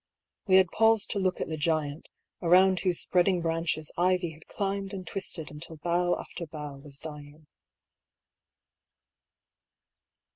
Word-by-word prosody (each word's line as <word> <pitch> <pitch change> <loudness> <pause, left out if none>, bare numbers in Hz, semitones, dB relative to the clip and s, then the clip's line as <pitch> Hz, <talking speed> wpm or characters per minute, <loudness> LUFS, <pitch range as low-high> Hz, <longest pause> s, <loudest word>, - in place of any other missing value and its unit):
We 190 - +5
had 190 -2 +5
paused 225 -1 +3
to 200 - -1
look 185 -1 0
at - - -2
the 160 - -4
giant, 155 -1 -1 0.3
around 185 +2 +5
whose 180 -3 +1
spreading 180 0 +2
branches 165 -2 -1
ivy 180 -1 +2
had 155 0 -16
climbed 195 0 -3
and 185 -1 -6
twisted 170 -4 -4
until 155 +2 -6
bough 175 +2 +1
after 170 - -7
bough 150 -2 -7
was 140 0 -6
dying. 150 0 -9
170 Hz, 135 wpm, -28 LUFS, 155-185 Hz, 0.3 s, We